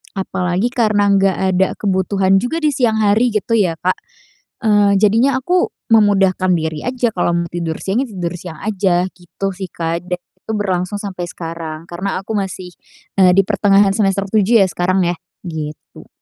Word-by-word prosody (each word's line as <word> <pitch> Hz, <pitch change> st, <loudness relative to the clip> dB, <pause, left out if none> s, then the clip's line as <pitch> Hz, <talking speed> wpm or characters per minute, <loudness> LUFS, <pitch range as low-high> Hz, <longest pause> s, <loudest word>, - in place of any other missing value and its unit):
apalagi 185 Hz, +2 st, -1 dB
karena 215 Hz, -5 st, +2 dB
nggak 195 Hz, -1 st, +3 dB, 0.2 s
ada 190 Hz, +1 st, +3 dB
kebutuhan 195 Hz, 0 st, +1 dB
juga 310 Hz, +11 st, -2 dB
di 305 Hz, -, +3 dB
siang 230 Hz, -5 st, +1 dB
hari 215 Hz, +3 st, +3 dB
gitu 215 Hz, +2 st, -1 dB
ya, 180 Hz, -6 st, +1 dB
Kak. 185 Hz, +2 st, 0 dB, 0.7 s
Eee, 205 Hz, -1 st, +4 dB
jadinya 230 Hz, +6 st, +3 dB
aku 355 Hz, +7 st, +1 dB, 0.2 s
memudahkan 195 Hz, -4 st, +3 dB
diri 160 Hz, -2 st, -3 dB
aja. 250 Hz, -2 st, 0 dB
Kalau 175 Hz, -, +1 dB
mau 170 Hz, 0 st, -1 dB
tidur 170 Hz, -2 st, -3 dB
siang 195 Hz, +5 st, 0 dB
ya -, -, -11 dB
tidur 180 Hz, -2 st, -3 dB
siang 165 Hz, -2 st, -9 dB
aja 190 Hz, -4 st, +1 dB
gitu 175 Hz, +2 st, -6 dB
sih, 190 Hz, 0 st, -5 dB
Kak, 165 Hz, +1 st, -3 dB
dan 180 Hz, 0 st, -2 dB
itu 185 Hz, +4 st, -11 dB
berlangsung 185 Hz, -2 st, -1 dB
sampai 185 Hz, -4 st, -5 dB
sekarang 165 Hz, -2 st, -7 dB
karena 185 Hz, +2 st, -3 dB
aku 220 Hz, -, -7 dB
masih, 185 Hz, -2 st, -4 dB, 0.5 s
eee, 180 Hz, -1 st, +6 dB
di 195 Hz, -, +5 dB
pertengahan 200 Hz, 0 st, +3 dB
semester 195 Hz, -1 st, +1 dB
7 220 Hz, 0 st, +4 dB
ya -, -, +2 dB
sekarang 185 Hz, +1 st, +1 dB
ya, 175 Hz, -, -1 dB, 0.3 s
gitu. 155 Hz, -3 st, -7 dB
195 Hz, 170 wpm, -17 LUFS, 180-210 Hz, 0.7 s, eee